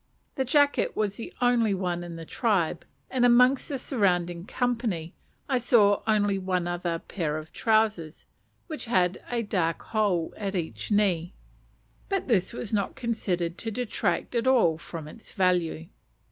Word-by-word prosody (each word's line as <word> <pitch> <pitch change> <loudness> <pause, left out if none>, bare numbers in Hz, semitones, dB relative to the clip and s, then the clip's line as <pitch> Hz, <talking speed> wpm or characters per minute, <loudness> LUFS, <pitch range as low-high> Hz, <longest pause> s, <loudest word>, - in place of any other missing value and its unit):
The 265 - -1
jacket 285 +2 +2
was 205 -2 -1
the 230 - -7
only 235 -4 +3
one 175 -2 -2
in 170 -1 -7
the 165 0 -8
tribe; 180 -6 0 0.3
and 255 -2 +1
amongst 250 +2 +5
the 280 - -2
surrounding 180 - 0
company 230 -11 -2 0.3
I 260 -3 +1
saw 220 -5 +4
only 205 -2 +2
one 185 -2 -1
other 175 -1 -2
pair 160 -3 -3
of 155 +1 -9
trousers, 215 -8 +1 0.4
which 310 -3 -6
had 185 -5 +1
a 235 -3 -1
large 165 -3 +1
hole 200 -7 0
at 200 -2 -3
each 170 -3 -4
knee; 195 -5 +1 0.7
but 390 -2 -1
this 205 -8 +2
was 230 -2 -6
not 200 -3 0
considered 185 -8 -2
to 225 - -3
detract 240 +2 -2
at 235 +1 0
all 220 -12 +4
from 165 -3 -8
its 220 +8 -12
value. 180 -4 +1
200 Hz, 155 wpm, -27 LUFS, 175-235 Hz, 0.7 s, amongst